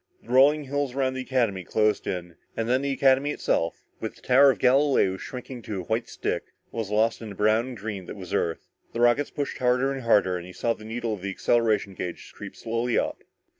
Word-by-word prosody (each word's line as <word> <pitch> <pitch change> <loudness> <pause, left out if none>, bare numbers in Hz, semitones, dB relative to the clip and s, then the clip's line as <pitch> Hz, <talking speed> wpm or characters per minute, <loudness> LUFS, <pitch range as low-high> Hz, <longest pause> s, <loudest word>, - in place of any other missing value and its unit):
The - - -18
rolling 140 +4 +5
hills 140 -1 -2
around 130 -1 +1
the 130 - -4
Academy 120 -8 0
closed 105 +2 +1
in, 90 -2 -4 0.2
and 115 - -1
then 130 +2 +2
the 140 0 -1
Academy 135 +1 +3
itself, 85 - -1 0.2
with - - -5
the - - -20
Tower 135 +2 +6
of 135 - +2
Galileo 130 -7 +3
shrinking 125 +3 -8
to 105 -3 -4
a - - -8
white 110 +6 -2
stick, - - -3 0.3
was 110 -4 -4
lost 110 +3 +1
in 110 - -6
the 100 - -8
brown 110 +4 +2
and 125 -2 -7
green 100 -3 -6
that - - -7
was 95 -3 -8
Earth. 85 -1 -1 0.3
The 115 - -3
rockets 120 +4 +3
pushed 145 -1 -4
harder 125 +2 +2
and 135 - -5
harder 105 -6 +3
and 90 0 -8
he 90 - -11
saw 115 +4 0
the 110 - -13
needle 115 0 -3
of 100 - -6
the 100 - -3
acceleration 110 0 +1
gauge 90 -1 -6
creep - - -9
slowly 115 +1 -1
up. - - -1
115 Hz, 225 wpm, -26 LUFS, 105-130 Hz, 0.3 s, Tower